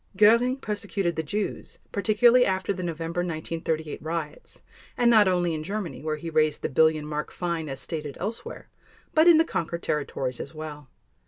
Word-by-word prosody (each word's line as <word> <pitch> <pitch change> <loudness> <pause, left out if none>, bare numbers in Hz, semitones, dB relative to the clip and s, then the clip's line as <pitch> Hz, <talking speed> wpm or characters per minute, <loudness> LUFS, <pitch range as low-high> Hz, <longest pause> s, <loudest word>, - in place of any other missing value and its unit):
Göring 235 +5 +5
persecuted 205 -6 -2
the 160 - 0
Jews, 200 +7 -4
particularly 220 +5 +4
after 190 -2 0
the 185 - -6
November 170 0 -3
1938 160 -2 -3
riots, 160 -1 -6 0.3
and 240 -1 +4
not 215 -3 +6
only 175 -2 +1
in 155 - -3
Germany 200 0 -4
where 155 0 -2
he 165 +2 -6
raised 155 -1 +1
the - - 0
billion 155 +2 +3
mark 150 0 -4
fine 170 -3 -3
as 135 0 -5
stated 150 -1 -5
elsewhere, 230 - -5 0.5
but 315 +2 +5
in 340 -2 +8
the 325 - +4
conquered 170 - -3
territories 135 -4 -2
as 145 - -7
well. 150 -3 -8
170 Hz, 170 wpm, -26 LUFS, 155-205 Hz, 0.5 s, in